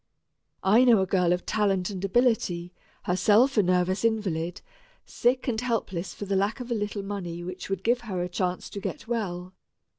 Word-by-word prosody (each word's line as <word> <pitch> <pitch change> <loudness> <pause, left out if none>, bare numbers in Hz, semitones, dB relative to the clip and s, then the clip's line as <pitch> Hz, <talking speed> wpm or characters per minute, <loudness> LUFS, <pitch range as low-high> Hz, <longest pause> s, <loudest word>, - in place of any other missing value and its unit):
I 215 +6 +5
know 240 -4 +6
a - - +2
girl 180 -2 +2
of 180 0 0
talent 200 -3 0
and 190 -1 -6
ability 195 -5 +1 0.3
herself 215 +9 +3
a 215 - +5
nervous 185 +1 +1
invalid 185 -7 -1 0.4
sick 250 +3 0
and 225 -2 0
helpless 205 -7 -2
for 205 - -6
the 200 0 -1
lack 200 +6 0
of 245 -1 -7
a - - +3
little 205 -2 -3
money 180 -4 -5
which 185 +2 -7
would 195 -1 -3
give 240 +2 +2
her 190 -6 -3
a - - -2
chance 180 0 -2
to 200 - -5
get 200 - -6
well. 185 -6 -3
195 Hz, 185 wpm, -27 LUFS, 180-225 Hz, 0.4 s, know